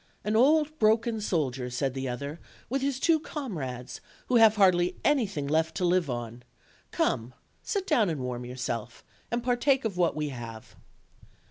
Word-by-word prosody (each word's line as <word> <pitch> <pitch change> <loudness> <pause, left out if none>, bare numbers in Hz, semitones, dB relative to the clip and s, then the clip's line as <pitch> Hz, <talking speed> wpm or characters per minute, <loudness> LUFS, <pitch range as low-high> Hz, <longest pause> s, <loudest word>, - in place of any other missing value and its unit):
"An 210 +1 -1
old 305 +5 +3
broken 225 +1 +2
soldier," 135 -10 -1
said 125 +2 -1
the 135 -1 -3
other, 140 +6 -5 0.3
"with 270 +1 0
his 275 -1 -1
two 325 +2 +3
comrades, 150 - -6 0.3
who 250 - +4
have 220 -2 +7
hardly 180 -3 +4
anything 210 - +1
left 160 +3 0
to 180 - 0
live 175 -3 +2
on; 120 -1 -5 0.5
come, 120 +3 -1 0.3
sit 400 -3 -2
down 245 - +3
and 155 -4 -2
warm 125 -1 -4
yourself, 120 -2 -5 0.3
and 235 0 -2
partake 255 +1 +2
of 200 -5 -2
what 175 -4 +2
we 150 -1 -2
have." 115 -4 -9
180 Hz, 160 wpm, -28 LUFS, -, 0.5 s, have